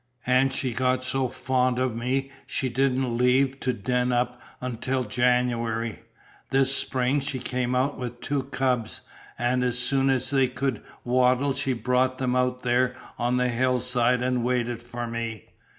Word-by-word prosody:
And 130 Hz, +1 st, +3 dB
she 130 Hz, -2 st, -1 dB
got 130 Hz, +1 st, +1 dB
so 130 Hz, 0 st, 0 dB
fond 125 Hz, 0 st, 0 dB
of 130 Hz, -2 st, 0 dB
me 130 Hz, +3 st, -1 dB, 0.2 s
she 130 Hz, -, -1 dB
didn't 130 Hz, -1 st, 0 dB
leave 130 Hz, +2 st, +3 dB
to 130 Hz, -, 0 dB
den 125 Hz, +2 st, 0 dB
up 125 Hz, 0 st, 0 dB, 0.2 s
until 125 Hz, +1 st, -2 dB
January. 120 Hz, -1 st, 0 dB, 0.5 s
This 135 Hz, 0 st, +3 dB
spring 130 Hz, +2 st, 0 dB
she 135 Hz, -1 st, -3 dB
came 125 Hz, 0 st, -2 dB
out 135 Hz, +3 st, 0 dB
with 120 Hz, -1 st, -5 dB
two 145 Hz, +1 st, -1 dB
cubs, 130 Hz, -4 st, -1 dB, 0.4 s
an' 125 Hz, +1 st, +1 dB
as 125 Hz, -1 st, 0 dB
soon 135 Hz, +2 st, +2 dB
as 130 Hz, 0 st, 0 dB
they 135 Hz, -2 st, +3 dB
could 125 Hz, -1 st, -2 dB, 0.2 s
waddle 130 Hz, +2 st, +3 dB
she 135 Hz, -1 st, -1 dB
brought 125 Hz, +2 st, +1 dB
'em 125 Hz, -1 st, 0 dB
out 125 Hz, 0 st, 0 dB
there 125 Hz, +1 st, +2 dB, 0.2 s
on 120 Hz, +1 st, +1 dB
the 125 Hz, 0 st, +2 dB
hillside 125 Hz, 0 st, +1 dB
an' 125 Hz, -1 st, +1 dB
waited 120 Hz, -1 st, -1 dB
for 120 Hz, 0 st, -5 dB
me. 115 Hz, -2 st, -5 dB
125 Hz, 160 wpm, -26 LUFS, 120-130 Hz, 0.5 s, And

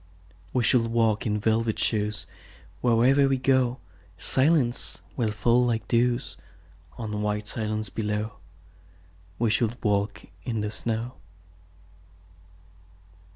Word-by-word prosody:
We 125 Hz, -, +1 dB
shall 115 Hz, 0 st, +4 dB
walk 115 Hz, -2 st, +1 dB
in 105 Hz, 0 st, 0 dB
velvet 110 Hz, +1 st, +1 dB
shoes: 105 Hz, -1 st, 0 dB, 0.6 s
Wherever 125 Hz, +4 st, +4 dB
we 135 Hz, -1 st, +2 dB
go 130 Hz, -1 st, +2 dB, 0.4 s
Silence 130 Hz, -, +2 dB, 0.2 s
will 115 Hz, -4 st, 0 dB
fall 115 Hz, +4 st, +2 dB
like 115 Hz, -2 st, -1 dB
dews 120 Hz, +1 st, +1 dB, 0.6 s
On 105 Hz, -2 st, -4 dB
white 105 Hz, 0 st, -2 dB
silence 110 Hz, -2 st, -3 dB
below. 105 Hz, 0 st, -3 dB, 1.0 s
We 115 Hz, -2 st, +1 dB
shall 110 Hz, 0 st, +2 dB
walk 100 Hz, -1 st, 0 dB, 0.2 s
in 115 Hz, +1 st, -2 dB
the 105 Hz, 0 st, -2 dB
snow. 115 Hz, +3 st, -3 dB
115 Hz, 110 wpm, -26 LUFS, 105-120 Hz, 1.0 s, shall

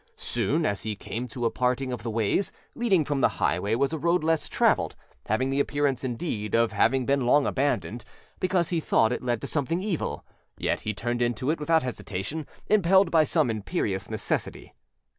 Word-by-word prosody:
Soon 130 Hz, +8 st, -1 dB, 0.2 s
he 110 Hz, -1 st, -3 dB
came 115 Hz, +4 st, -5 dB
to 120 Hz, 0 st, -4 dB
a 115 Hz, -, +2 dB
parting 125 Hz, +1 st, 0 dB
of 120 Hz, -, -5 dB
the 115 Hz, -, -4 dB
ways; 110 Hz, -, 0 dB, 0.2 s
leading 195 Hz, -10 st, +2 dB
from 145 Hz, -2 st, -1 dB
the -, -, +2 dB
highway 100 Hz, +6 st, +1 dB
was 140 Hz, +5 st, +1 dB
a 160 Hz, -, -2 dB
road 170 Hz, +1 st, +2 dB
less 160 Hz, -1 st, +1 dB
traveled, -, -, +2 dB, 0.3 s
having 130 Hz, +5 st, +1 dB
the 135 Hz, -, 0 dB
appearance, 140 Hz, -2 st, 0 dB
indeed, 115 Hz, -5 st, -2 dB
of 115 Hz, 0 st, +3 dB
having 130 Hz, -1 st, +2 dB
been 135 Hz, -2 st, +1 dB
long 145 Hz, +3 st, +5 dB
abandoned, 125 Hz, -4 st, -1 dB, 0.4 s
because, 185 Hz, -3 st, +1 dB
he 170 Hz, -, 0 dB
thought, 115 Hz, -7 st, +2 dB
it 125 Hz, -, -2 dB
led 120 Hz, -3 st, -1 dB
to -, -, -4 dB
something 165 Hz, +5 st, -1 dB
evil; 200 Hz, -7 st, -3 dB, 0.3 s
yet -, -, -1 dB
he 110 Hz, -, -2 dB
turned 120 Hz, +3 st, -2 dB
into 120 Hz, +3 st, 0 dB
it 165 Hz, -, -2 dB
without 160 Hz, +1 st, +2 dB
hesitation, 125 Hz, +4 st, -4 dB, 0.2 s
impelled 195 Hz, -1 st, +4 dB
by 160 Hz, -2 st, +5 dB
some 125 Hz, -4 st, +2 dB
imperious 105 Hz, -, -2 dB
necessity. 110 Hz, -1 st, -3 dB
130 Hz, 185 wpm, -26 LUFS, 115-160 Hz, 0.4 s, long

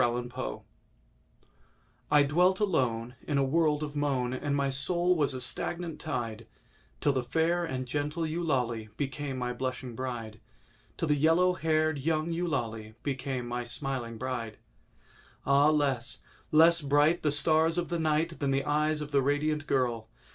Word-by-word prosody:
EULALIE 120 Hz, -, -3 dB, 1.5 s
I 150 Hz, -1 st, +6 dB
DWELT 180 Hz, +6 st, +3 dB
alone 125 Hz, -, 0 dB
In 145 Hz, -, +1 dB
a 140 Hz, -, +3 dB
world 150 Hz, +1 st, +2 dB
of 150 Hz, -1 st, -5 dB
moan, 135 Hz, -4 st, 0 dB
And 140 Hz, +2 st, -1 dB
my 140 Hz, -1 st, +1 dB
soul 175 Hz, +6 st, +2 dB
was 145 Hz, -4 st, +1 dB
a -, -, -3 dB
stagnant 170 Hz, +6 st, -4 dB
tide, 115 Hz, -7 st, -4 dB, 0.5 s
Till 145 Hz, -, +2 dB
the 130 Hz, -, 0 dB
fair 165 Hz, +7 st, +1 dB
and 130 Hz, -6 st, -3 dB
gentle 150 Hz, +5 st, -2 dB
Eulalie 130 Hz, -9 st, -1 dB
became 140 Hz, -1 st, -3 dB
my 125 Hz, -1 st, -2 dB
blushing 130 Hz, 0 st, -4 dB
bride— 115 Hz, -3 st, -5 dB, 0.6 s
Till 165 Hz, -, -1 dB
the 150 Hz, -, +4 dB
yellow 165 Hz, +5 st, +4 dB
haired 155 Hz, -3 st, +1 dB
young 155 Hz, +3 st, 0 dB
Eulalie 115 Hz, -11 st, -3 dB
became 130 Hz, -3 st, -3 dB
my 120 Hz, 0 st, -3 dB
smiling 120 Hz, -2 st, -4 dB
bride. 120 Hz, -3 st, -4 dB, 0.9 s
Ah, 140 Hz, +2 st, +5 dB
less—less 155 Hz, +4 st, +2 dB
bright 145 Hz, +4 st, +3 dB
The 150 Hz, -, +1 dB
stars 160 Hz, +3 st, +3 dB
of 175 Hz, -, -1 dB
the 170 Hz, -1 st, -1 dB
night 160 Hz, +1 st, 0 dB
Than 140 Hz, -, 0 dB
the 135 Hz, 0 st, +1 dB
eyes 150 Hz, +1 st, +1 dB
of 150 Hz, 0 st, -6 dB
the 140 Hz, -1 st, +3 dB
radiant 145 Hz, +2 st, 0 dB
girl! 120 Hz, -4 st, 0 dB
145 Hz, 150 wpm, -29 LUFS, 125-155 Hz, 1.5 s, I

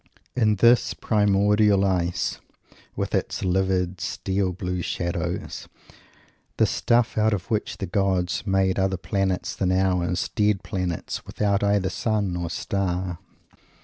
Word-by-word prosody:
Is 110 Hz, -4 st, +3 dB
this 115 Hz, +4 st, +4 dB
primordial 105 Hz, -1 st, +3 dB
ice, 90 Hz, -1 st, 0 dB, 0.6 s
with -, -, -3 dB
its -, -, -1 dB
livid 95 Hz, -1 st, 0 dB
steel 95 Hz, -1 st, -1 dB
blue 90 Hz, -1 st, -3 dB
shadows, 85 Hz, -1 st, -3 dB, 0.9 s
the -, -, +5 dB
stuff 120 Hz, -2 st, +1 dB
out 110 Hz, 0 st, +3 dB
of 95 Hz, +2 st, -8 dB
which 110 Hz, -1 st, -1 dB
the 95 Hz, -, -3 dB
gods 95 Hz, -1 st, 0 dB
make 95 Hz, 0 st, +2 dB
other 95 Hz, 0 st, +1 dB
planets 95 Hz, 0 st, -1 dB
than 95 Hz, -2 st, 0 dB
ours 90 Hz, -1 st, +1 dB
dead 105 Hz, -2 st, +1 dB
planets, 90 Hz, -3 st, -3 dB
without 100 Hz, -1 st, 0 dB
either 100 Hz, -2 st, +2 dB
sun 105 Hz, -5 st, -1 dB
or 85 Hz, -1 st, -3 dB
star? 90 Hz, -1 st, -2 dB
95 Hz, 125 wpm, -24 LUFS, 90-105 Hz, 0.9 s, the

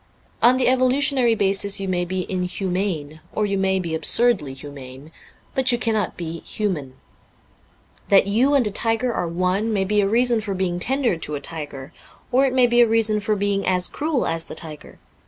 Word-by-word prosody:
On 250 Hz, +2 st, +6 dB
the 255 Hz, -, +1 dB
evolutionary 255 Hz, -1 st, +3 dB
basis 200 Hz, 0 st, +2 dB
you 195 Hz, -, -4 dB
may 180 Hz, -1 st, -1 dB
be 185 Hz, 0 st, -3 dB
inhumane, 180 Hz, -4 st, -3 dB
or 210 Hz, -, 0 dB
you 200 Hz, -1 st, -1 dB
may 190 Hz, 0 st, +1 dB
be 170 Hz, -3 st, -4 dB
absurdly 160 Hz, -, +2 dB
humane; 140 Hz, +1 st, -11 dB, 0.4 s
but 260 Hz, -1 st, +1 dB
you 240 Hz, -, +1 dB
cannot 220 Hz, -4 st, -2 dB
be 170 Hz, -1 st, -6 dB
human. 155 Hz, -13 st, -4 dB, 1.1 s
That 195 Hz, -, +5 dB
you 245 Hz, +8 st, +2 dB
and 265 Hz, -4 st, +3 dB
a 210 Hz, -, -1 dB
tiger 225 Hz, +4 st, 0 dB
are 175 Hz, -, -2 dB
one 185 Hz, +6 st, -1 dB
may 200 Hz, -3 st, 0 dB
be 205 Hz, +2 st, +1 dB
a 195 Hz, -, +1 dB
reason 235 Hz, 0 st, +2 dB
for 200 Hz, -2 st, -4 dB
being 180 Hz, -2 st, -2 dB
tender 255 Hz, -2 st, +1 dB
to 150 Hz, -2 st, -4 dB
a -, -, -4 dB
tiger. 145 Hz, -3 st, -7 dB, 0.4 s
Or 265 Hz, +2 st, +3 dB
it 255 Hz, -, -2 dB
may 255 Hz, -1 st, +5 dB
be 240 Hz, 0 st, +3 dB
a 240 Hz, -, +5 dB
reason 220 Hz, -1 st, +2 dB
for 210 Hz, +1 st, -1 dB
being 200 Hz, 0 st, -1 dB
as 180 Hz, -1 st, +3 dB
cruel 300 Hz, -3 st, -2 dB
as 165 Hz, 0 st, -1 dB
the -, -, -9 dB
tiger. 155 Hz, -3 st, -6 dB
195 Hz, 190 wpm, -21 LUFS, 175-235 Hz, 1.1 s, On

